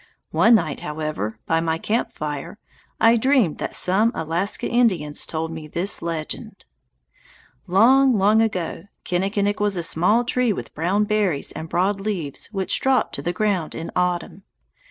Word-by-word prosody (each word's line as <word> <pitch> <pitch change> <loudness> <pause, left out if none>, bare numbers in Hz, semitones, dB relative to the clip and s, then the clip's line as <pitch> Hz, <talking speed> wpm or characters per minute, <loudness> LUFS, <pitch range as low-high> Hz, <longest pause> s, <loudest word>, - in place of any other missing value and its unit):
One 230 +1 +5
night, 160 -8 -1
however, 150 -9 -4
by 165 - +1
my 165 -1 -1
camp 220 +7 -1
fire, 150 +5 -6 0.4
I 230 +1 +5
dreamed 245 - +2
that - - -3
some 205 +5 +3
Alaska 165 +5 -2
Indians 185 -12 +1
told 160 0 -3
me 160 -1 -7
this 175 +6 -1
legend: 170 +6 -5 1.0
Long, 245 +7 +5
long 210 +3 +4
ago, 180 -5 -2 0.2
Kinnikinick 200 +3 0
was 205 -2 +1
a 170 - -2
small 180 +8 +3
tree 245 -1 +1
with - - -6
brown 180 +7 +1
berries 205 -8 +1
and 160 - -7
broad 195 +4 0
leaves 185 -9 -4
which 195 -3 0
dropped 265 -1 +1
to - - -3
the 175 - -2
ground 195 -4 -1
in 165 - -6
autumn. 180 +1 -1
190 Hz, 155 wpm, -22 LUFS, 165-215 Hz, 1.0 s, One